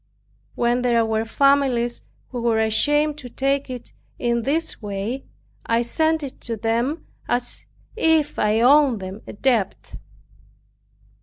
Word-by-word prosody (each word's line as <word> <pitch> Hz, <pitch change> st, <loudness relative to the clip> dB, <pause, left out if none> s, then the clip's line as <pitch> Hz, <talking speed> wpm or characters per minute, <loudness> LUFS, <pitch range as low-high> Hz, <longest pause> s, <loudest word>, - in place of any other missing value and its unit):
When 240 Hz, +1 st, +1 dB
there 235 Hz, -2 st, +2 dB
were 220 Hz, 0 st, 0 dB
families 260 Hz, -2 st, +2 dB, 0.3 s
who 245 Hz, -2 st, -5 dB
were 230 Hz, -1 st, +2 dB
ashamed 295 Hz, +7 st, +2 dB
to 250 Hz, -4 st, -8 dB
take 275 Hz, +2 st, -1 dB
it 250 Hz, -2 st, -8 dB, 0.2 s
in 235 Hz, -1 st, 0 dB
this 310 Hz, +6 st, -1 dB
way, 210 Hz, +5 st, -4 dB, 0.4 s
I 230 Hz, +1 st, +1 dB
sent 315 Hz, +5 st, 0 dB
it 270 Hz, -, -8 dB
to 230 Hz, -2 st, -4 dB
them 235 Hz, +8 st, -1 dB, 0.2 s
as 245 Hz, 0 st, -2 dB, 0.3 s
if 320 Hz, -8 st, +2 dB
I 215 Hz, +1 st, +2 dB
owed 270 Hz, -2 st, +5 dB
them 190 Hz, +2 st, -7 dB
a -, -, -7 dB
debt. 225 Hz, -4 st, -1 dB
245 Hz, 135 wpm, -22 LUFS, 225-280 Hz, 0.4 s, owed